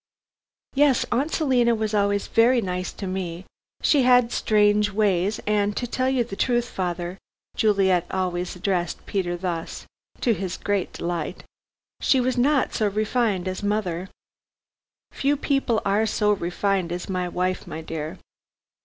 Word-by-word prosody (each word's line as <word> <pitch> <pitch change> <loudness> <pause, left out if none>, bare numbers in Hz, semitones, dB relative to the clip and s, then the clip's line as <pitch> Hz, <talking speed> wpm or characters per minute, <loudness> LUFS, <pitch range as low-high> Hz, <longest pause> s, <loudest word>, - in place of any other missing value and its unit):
"Yes, 280 -2 +3
Aunt 275 +6 +1
Selina 250 -6 +2
was 215 -1 -2
always 200 -1 +1
very 240 +2 +4
nice 180 -3 -3
to 200 - -7
me. 185 -1 -4 0.4
She 290 - +4
had 245 -2 +5
strange 210 -1 +3
ways, 200 -1 +1
and, 210 -1 +1
to 245 - -1
tell 255 +2 0
you 260 -2 +2
the 225 -4 -7
truth, 240 +2 +1
father," 180 -1 -4 0.4
Juliet 190 -5 +2
always 180 -1 -2
addressed 180 -2 -2
Peter 175 -3 -2
thus, 170 -2 -4 0.4
to 235 - +3
his 190 -4 -4
great 200 -3 -1
delight, 170 0 -4 0.6
"she 265 - +3
was 255 0 +1
not 270 +3 +2
so 215 - +1
refined 210 -2 0
as 185 0 -3
mother 190 -4 -1 0.5
" - - -70
"Few 285 +1 0
people 275 -5 0
are 205 +3 +2
so 210 0 +2
refined 190 -1 0
as 175 0 -4
my 180 -2 -2
wife, 185 +1 -2
my 160 - -6
dear." 160 +2 -5
200 Hz, 150 wpm, -24 LUFS, 180-235 Hz, 0.6 s, had